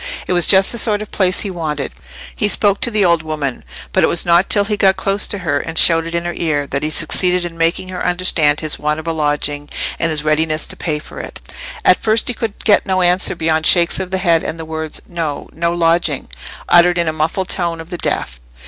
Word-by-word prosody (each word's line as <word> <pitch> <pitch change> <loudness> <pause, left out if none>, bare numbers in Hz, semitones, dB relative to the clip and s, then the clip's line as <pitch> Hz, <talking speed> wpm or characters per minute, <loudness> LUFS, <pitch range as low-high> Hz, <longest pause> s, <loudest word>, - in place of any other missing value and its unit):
It - - -2
was 175 -1 +3
just 195 -1 +5
the 235 - +2
sort 215 -2 +2
of 215 - -14
place 185 -1 +1
he 200 - -3
wanted. 155 -5 -4 0.4
He 210 - 0
spoke 200 -1 +1
to - - +3
the 210 -3 +1
old 170 -2 +3
woman; 155 -4 -4 0.3
but - - +2
it - - +5
was 170 - +1
not 175 +2 +3
till 205 - +4
he 210 +1 -1
got 195 -2 +3
close 195 +2 +1
to 205 - -2
her 145 -2 0
and 165 +2 -6
shouted 165 0 +4
in 170 0 -2
her 175 - -3
ear, 150 -4 -1
that 140 0 -3
he 155 - -2
succeeded 180 +3 +1
in 170 -1 -7
making 165 +3 -1
her 185 -1 -5
understand 175 -5 +1
his 155 -1 -1
want 150 +1 -1
of 160 - -9
a 165 - -2
lodging, 145 -1 -2 0.3
and 165 - +1
his 155 -2 -1
readiness 155 0 0
to - - -8
pay 155 -3 -3
for 150 - -11
it. - - -8 0.5
At - - +4
first 220 +2 +1
he - - -1
could 225 -3 -5
get 205 -2 +3
no 185 -1 +1
answer 180 +1 +2
beyond 160 -1 0
shakes 175 0 +4
of 190 -1 -4
the 190 - -1
head 170 -3 +2
and 165 - -5
the 160 - -6
words, 160 -1 -4
"No—no 165 0 -3
lodging," 165 -4 0 0.4
uttered 175 0 +4
in 170 - +1
the 155 - -1
muffled 165 +5 -2
tone 170 -2 -2
of 165 +2 -11
the 175 - -5
deaf. 60 0 -3
170 Hz, 240 wpm, -16 LUFS, 155-185 Hz, 0.5 s, just